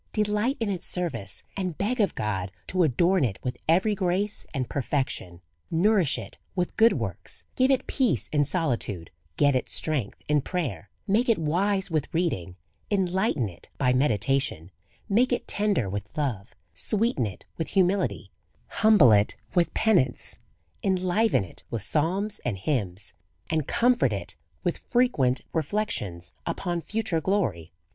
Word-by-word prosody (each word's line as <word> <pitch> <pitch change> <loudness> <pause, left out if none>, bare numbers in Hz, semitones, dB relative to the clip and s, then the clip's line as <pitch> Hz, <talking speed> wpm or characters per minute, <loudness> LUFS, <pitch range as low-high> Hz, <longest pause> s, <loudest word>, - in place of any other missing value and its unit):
Delight 210 +5 +1
in 220 -3 0
its 180 -3 -2
service, 125 - -2
and 185 -5 -3
beg 235 +5 -1
of 200 - +1
God 100 -3 -2
to 185 - 0
adorn 170 +4 +3
it 105 -7 0
with 125 -1 -2
every 190 +6 +4
grace 195 +2 -1
and 130 -4 -2
perfection. 130 - -2 0.3
Nourish 185 -2 +3
it - - -9 0.2
with 180 -2 -1
good 225 +1 +6
works, - - -4
give 260 +1 +3
it 265 -2 +2
peace 230 - +1
in 145 -1 +2
solitude, 125 - -1 0.3
get 145 -2 +4
it 130 - -1
strength 140 -10 -1
in 150 -1 +3
prayer, 130 - -3 0.2
make 220 +5 +2
it 230 - +4
wise 190 +5 0
with 155 -3 -1
reading, 120 - -1 0.3
enlighten 190 - +1
it 85 -3 -12
by 125 -2 +2
meditation, 125 - +1 0.4
make 230 +5 +3
it 245 - -1
tender 200 - +1
with 100 +1 -4
love, 120 -9 -2 0.2
sweeten 200 - +1
it 95 -3 -10
with 165 - -2
humility, 190 0 +1 0.4
humble 210 - +6
it 105 0 +4 0.2
with 175 -2 +2
patience, 175 - +2 0.4
en 190 - +2
liven 185 - +2
it 90 - -12
with 115 -4 -3
psalms 190 - -1
and 115 -6 -2
hymns, 100 - -2 0.4
and 155 -3 0
comfort 245 +1 +3
it - - -5 0.3
with - - -1
frequent 145 - +2
reflections 150 - -2
upon 175 -1 -2
future 210 -4 -1
glory. 110 - -1
165 Hz, 150 wpm, -26 LUFS, 120-200 Hz, 0.4 s, good